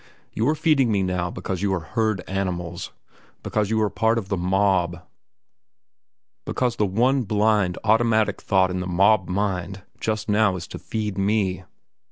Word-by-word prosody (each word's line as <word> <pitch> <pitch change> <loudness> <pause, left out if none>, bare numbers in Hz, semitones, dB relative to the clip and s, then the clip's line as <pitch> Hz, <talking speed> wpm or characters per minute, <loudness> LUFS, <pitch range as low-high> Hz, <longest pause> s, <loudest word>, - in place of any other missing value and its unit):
You 115 +5 +1
are 155 - +2
feeding 150 -7 +2
me 100 -2 +1
now 90 -1 -1
because 90 +1 -5
you 100 -1 0
are - - -2
herd 110 +3 -1
animals; 90 -3 -3 0.5
because 105 -2 -1
you 110 0 +1
are 105 - +1
part 115 +1 +1
of 100 -4 -4
the 100 - 0
mob; 90 -1 +1 1.4
because 125 -2 -1
the 105 - +2
one 125 +8 +2
blind, 105 -4 +1
automatic 110 0 +2
thought 95 -2 +2
in 90 - -2
the 90 - -4
mob 95 +2 +3
mind 95 -1 -2 0.2
just 110 -1 -2
now 105 -2 +3
is 85 -2 -6
to - - -7
feed 105 -3 -4
me. 95 -2 0
100 Hz, 165 wpm, -23 LUFS, 90-110 Hz, 1.4 s, mob